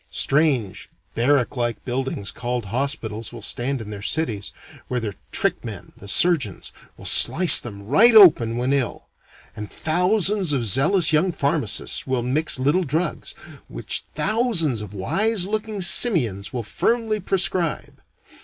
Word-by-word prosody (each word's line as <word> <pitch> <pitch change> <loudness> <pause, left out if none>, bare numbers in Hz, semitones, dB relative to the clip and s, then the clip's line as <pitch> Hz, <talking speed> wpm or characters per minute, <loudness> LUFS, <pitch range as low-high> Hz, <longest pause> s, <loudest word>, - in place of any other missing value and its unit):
Strange 135 - -1 0.2
barrack 135 +2 0
like 120 -3 -4
buildings 125 -6 -4
called 120 -1 -5
hospitals 115 -5 -3
will 120 -3 -11
stand 130 +4 -2
in 110 -2 -9
their 100 -1 -8
cities, 105 -6 -3 0.4
where 125 - -3
their 110 -3 -5 0.2
trick - - 0
men, - - -10
the 100 - -13
surgeons, 135 - +2 0.3
will - - -14
slice 180 0 +6
them 100 -4 -10
right 220 - +4
open 135 - +5
when 125 +3 -1
ill; 130 -5 -3 0.5
and 105 -1 -8
thousands 185 +1 +1
of 130 -4 -1
zealous 160 - +3
young 175 +5 +1
pharmacists 140 - -1
will 130 -2 -2
mix 145 +4 +1
little 145 +8 0
drugs, 160 +3 -4 0.3
which - - -3
thousands 210 - 0
of 105 -1 -10
wise 195 - 0
looking 210 -1 -4
simians 135 - +3
will 120 -3 -5
firmly 225 - -2
prescribe. 180 - -2
140 Hz, 140 wpm, -21 LUFS, 115-180 Hz, 0.5 s, slice